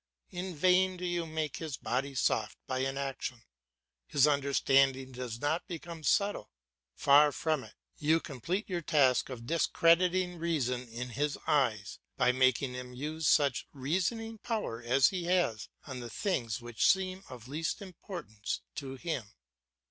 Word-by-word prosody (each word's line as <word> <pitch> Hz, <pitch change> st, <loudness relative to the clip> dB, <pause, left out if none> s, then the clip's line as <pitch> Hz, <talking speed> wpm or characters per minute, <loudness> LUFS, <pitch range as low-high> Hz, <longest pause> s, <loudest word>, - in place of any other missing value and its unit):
In 180 Hz, -1 st, -5 dB
vain 185 Hz, +3 st, +3 dB
do 180 Hz, -, -5 dB
you 175 Hz, -2 st, -1 dB
make 155 Hz, -2 st, -3 dB
his 155 Hz, -5 st, -5 dB
body 135 Hz, +3 st, -2 dB
soft 110 Hz, -3 st, 0 dB
by 130 Hz, -1 st, -2 dB
inaction; 135 Hz, -2 st, -3 dB, 0.6 s
his 140 Hz, -1 st, +4 dB
understanding 135 Hz, -2 st, +3 dB
does 125 Hz, -2 st, -6 dB
not 150 Hz, +7 st, -1 dB
become 170 Hz, -2 st, -7 dB
subtle. 205 Hz, +5 st, +1 dB, 0.5 s
Far 145 Hz, +1 st, +6 dB
from 155 Hz, -2 st, -1 dB
it, -, -, -14 dB, 0.2 s
you 160 Hz, +2 st, +3 dB
complete 165 Hz, -, -3 dB
your 180 Hz, -3 st, -2 dB
task 140 Hz, -6 st, +3 dB
of 120 Hz, -3 st, -7 dB
discrediting 175 Hz, +3 st, +3 dB
reason 130 Hz, -7 st, -1 dB
in 125 Hz, +2 st, -5 dB
his 145 Hz, +4 st, -1 dB
eyes, 115 Hz, -9 st, +1 dB, 0.2 s
by 125 Hz, -1 st, +4 dB
making 130 Hz, 0 st, +2 dB
him 125 Hz, 0 st, -7 dB
use 150 Hz, +4 st, -3 dB
such 140 Hz, -4 st, +3 dB
reasoning 190 Hz, -, -2 dB
power 215 Hz, -, -3 dB
as 125 Hz, +3 st, +4 dB
he 180 Hz, -3 st, -3 dB
has 175 Hz, -12 st, +1 dB, 0.2 s
on 130 Hz, -3 st, -6 dB
the 120 Hz, -1 st, -7 dB
things 120 Hz, -, -2 dB
which 120 Hz, 0 st, -3 dB
seem 190 Hz, 0 st, -2 dB
of 125 Hz, -2 st, -10 dB
least 155 Hz, +4 st, -2 dB
importance 175 Hz, -, -6 dB
to 135 Hz, -2 st, -6 dB
him. 135 Hz, -8 st, -4 dB
145 Hz, 150 wpm, -31 LUFS, 125-175 Hz, 0.6 s, Far